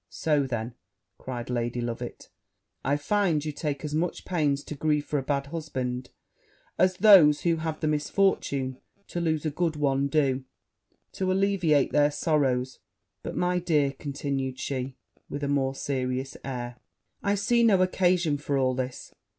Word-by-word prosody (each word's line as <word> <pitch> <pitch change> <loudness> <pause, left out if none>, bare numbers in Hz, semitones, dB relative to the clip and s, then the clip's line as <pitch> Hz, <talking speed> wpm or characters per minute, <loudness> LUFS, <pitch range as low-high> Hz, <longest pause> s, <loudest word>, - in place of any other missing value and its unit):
'So, 150 -3 +1
then,' 120 -1 -3 0.5
cried 120 -2 -5
Lady 120 0 -2
Loveit, 120 0 -5 0.5
'I 140 +2 +1
find 165 -1 +1
you 155 - -2
take 145 0 -3
as 150 - -4
much 165 +3 -1
pains 145 -5 0
to - - -7
grieve 150 0 0
for 150 - -1
a - - -2
bad 140 0 -1
husband, 130 -5 -4 0.7
as 185 0 +3
those 180 -8 +7
who 170 -1 +2
have 160 -1 -3
the 155 - +1
misfortune 150 -4 0 0.3
to 175 - -4
lose 160 -2 0
a 155 - 0
good 165 +1 -1
one 140 -2 +1
do 135 -3 +1 0.7
to 185 -1 -1
alleviate 185 -7 +2
their 145 0 +4
sorrows: 140 -4 0 0.4
but, - - -6
my 180 0 +1
dear,' 150 -6 +1
continued 135 -2 -3
she, 130 -1 -3 0.3
with 145 +1 -5
a - - 0
more 135 -1 0
serious 130 -1 -2
air, 120 -2 -5 0.4
'I 200 0 +1
see 235 +4 +2
no 215 -5 +5
occasion 180 -5 +2
for 145 -1 -1
all 130 -1 +2
this. 125 0 -5
145 Hz, 160 wpm, -27 LUFS, 130-165 Hz, 0.7 s, those